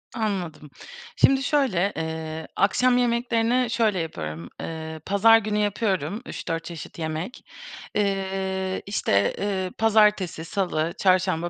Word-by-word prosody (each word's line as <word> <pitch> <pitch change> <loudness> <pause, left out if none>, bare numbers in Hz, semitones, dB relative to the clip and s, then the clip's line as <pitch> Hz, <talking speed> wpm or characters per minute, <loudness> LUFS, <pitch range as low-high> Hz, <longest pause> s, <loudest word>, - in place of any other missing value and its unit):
Anladım. 185 -9 -3 0.5
Şimdi 270 0 +4
şöyle, 235 - +1
eee, 160 0 -4
akşam 245 +6 +3
yemeklerini 240 0 +1
şöyle 220 -5 +1
yapıyorum, 85 - -5
eee, 160 -1 -6
pazar 225 +3 +6
günü 210 -1 -1
yapıyorum, 205 - -1
3-4 165 -1 -4
çeşit 170 0 -9
yemek. 160 +8 -4 0.5
Eee, 190 -1 -1
işte, 100 - +1
eee, 190 -2 -2
pazartesi, 210 -6 +3
salı, 165 -2 -1
çarşamba, 185 -2 +2
190 Hz, 110 wpm, -25 LUFS, 165-215 Hz, 0.5 s, pazar